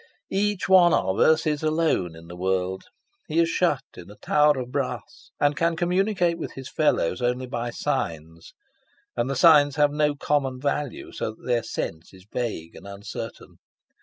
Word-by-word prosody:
Each 205 0 0
one 180 -2 +6
of 95 +1 0
us 160 0 +4
is 150 -1 0
alone 155 - 0
in 80 0 -13
the 85 +1 -10
world. 95 +1 -1 0.4
He 155 - -3
is 165 0 +4
shut 150 -7 +1
in 90 +1 -11
a 105 - -12
tower 150 +3 +3
of 125 -1 -5
brass, - - -4
and 145 0 +2
can 165 +2 +1
communicate 180 0 +1
with - - -5
his 135 -1 -8
fellows 130 - +1
only 125 +1 0
by 120 -2 -4
signs, 80 -7 -4 0.6
and 120 +2 -1
the 135 - -1
signs 145 -1 +6
have 145 -1 +3
no 150 0 +1
common 135 -3 -1
value, 140 -1 -3
so 110 - -4
that - - -19
their 120 -2 +1
sense 85 -5 -5
is 95 0 -17
vague 110 -10 -4
and - - -12
uncertain. 100 +1 -8
135 Hz, 175 wpm, -25 LUFS, 100-160 Hz, 0.6 s, one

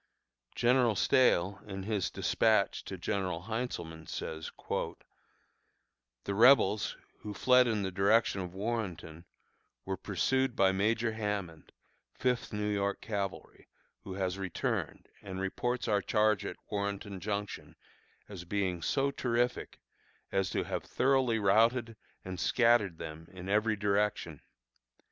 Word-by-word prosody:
General 120 -2 +3
Stahel, 95 -3 +3
in 95 -1 -5
his 105 -2 -1
despatch 110 -3 +1
to - - -6
General 90 -4 -2
Heintzelman, 90 -8 -4
says: 80 0 -5 1.7
"The 100 - -2
Rebels, 110 -2 +5 0.2
who 105 -1 -7
fled 125 -1 +5
in 110 -3 0
the 95 - -2
direction 100 +1 +3
of 90 0 -7
Warrenton, 95 -6 -4 0.6
were 95 0 -2
pursued 125 +7 0
by 95 -3 +4
Major 110 +4 +1
Hammond, 105 -7 -4 0.4
Fifth 125 0 -1
New 105 -1 -2
York 100 -1 0
Cavalry, 100 -3 -5 0.4
who 95 - -7
has 95 -1 -2
returned, 95 -2 -3
and 95 -1 -6
reports 120 +6 -2
our 105 -2 +2
charge 105 -1 +2
at - - -6
Warrenton 100 -1 -3
Junction 100 0 -4 0.5
as 95 -4 -8
being 90 -1 -1
so 140 - +1
terrific 120 -1 -1 0.5
as 95 -1 +1
to - - -1
have - - -3
thoroughly 130 -3 +2
routed 115 +3 +3 0.3
and 95 -1 -5
scattered 115 -6 +3
them 80 +1 -8
in 95 0 -9
every 105 +2 +2
direction. 105 0 0
100 Hz, 125 wpm, -31 LUFS, 95-115 Hz, 1.7 s, Rebels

